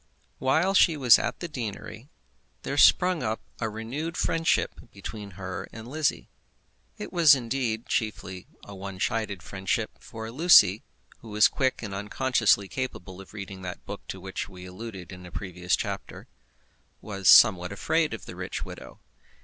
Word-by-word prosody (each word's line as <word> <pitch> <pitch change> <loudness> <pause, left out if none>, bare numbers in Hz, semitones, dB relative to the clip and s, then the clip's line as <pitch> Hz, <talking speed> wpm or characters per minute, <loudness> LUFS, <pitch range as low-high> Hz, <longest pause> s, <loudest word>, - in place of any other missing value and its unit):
While 160 +9 +2
she 170 -4 +5
was 125 -4 +7
at - - -3
the 175 - -3
deanery 120 -2 -7 0.5
there - - -3
sprung 180 -2 +5
up 110 +1 -2 0.2
a 115 - -1
renewed 125 +10 -5
friendship 165 0 0
between 100 0 -8
her 95 -1 -5
and 115 +1 -10
Lizzie. 150 +2 -1 0.7
It - - -7
was, 165 -5 +7
indeed, 120 -2 -2
chiefly 95 -5 -3 0.2
a 100 - -11
one 95 -1 -8
sided 105 -4 -2
friendship; 100 +3 -2
for 110 0 -8
Lucy, 115 - +6 0.4
who 115 - -13
was 105 +3 +5
quick 130 -1 -1
and 100 -3 -5
unconsciously 105 -1 +1
capable 95 -7 -6
of 95 - -15
reading 100 -2 -7
that 90 -1 -7
book - - -7
to 95 - -6
which 95 +2 -5
we 90 -2 -11
alluded 95 0 -9
in 90 -1 -10
a - - -13
previous 90 -2 -2
chapter, - - -6 0.7
was 100 -3 -1
somewhat 95 -5 +7
afraid 160 +10 0
of - - -12
the - - -9
rich - - -5
widow. - - -11
110 Hz, 155 wpm, -27 LUFS, 95-130 Hz, 0.7 s, was